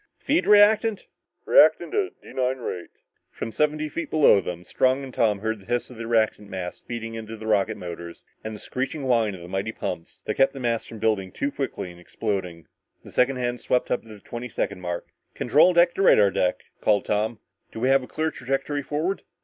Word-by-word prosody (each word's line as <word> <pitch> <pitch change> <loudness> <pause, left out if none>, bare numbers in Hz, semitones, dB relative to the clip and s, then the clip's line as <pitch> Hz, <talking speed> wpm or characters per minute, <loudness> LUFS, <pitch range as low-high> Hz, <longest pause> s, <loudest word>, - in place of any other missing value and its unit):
"Feed 300 +4 +1
reactant!" 210 +1 +5 0.4
"Reactant - - +5
at 405 -3 -1
D - - -12
9 130 0 0
rate." 90 -8 -5 0.4
From 115 - -6
seventy 150 +3 0
feet 170 +3 -5
below 145 -10 +5
them, 90 -1 -6
Strong 130 +7 +1
and 130 -2 -8
Tom 105 -3 +1
heard 110 0 -2
the 95 - -18
hiss 120 +1 -1
of 125 - -11
the 115 0 -5
reactant 110 -3 +1
mass 95 -2 -5
feeding 115 -1 -6
into 115 0 -7
the 110 - -9
rocket 110 0 +1
motors, 85 -1 -8 0.2
and 110 0 -5
the - - -9
screeching 135 +6 -4
whine 115 -6 +2
of 90 - -11
the 85 - -9
mighty 95 +4 -2
pumps 85 -6 -6
that - - -1
kept 135 0 +3
the 135 - -7
mass 115 -2 -1
from 115 - -9
building 105 -4 0
too 140 +9 -2
rapidly 130 -9 -3
and 85 - -15
exploding. 90 -4 -4 0.4
The - - -12
second 130 +2 +2
hand 120 -1 -2
swept 125 - 0
up - - +1
to - - -20
the 105 -2 -11
twenty 120 +4 -7
second 100 -3 -3
mark. 85 -1 -4 0.3
"Control 180 - +5
deck 170 0 +4
to - - -2
radar 105 - +6
deck," 90 -1 0 0.2
called 105 -1 +2
Tom. 110 +2 0 0.3
"Do - - -7
we 130 +3 +2
have 135 0 +5
a 125 - -9
clear 160 0 -1
trajectory 135 +2 -2
forward?" 155 +8 -2
115 Hz, 215 wpm, -25 LUFS, 100-135 Hz, 0.4 s, radar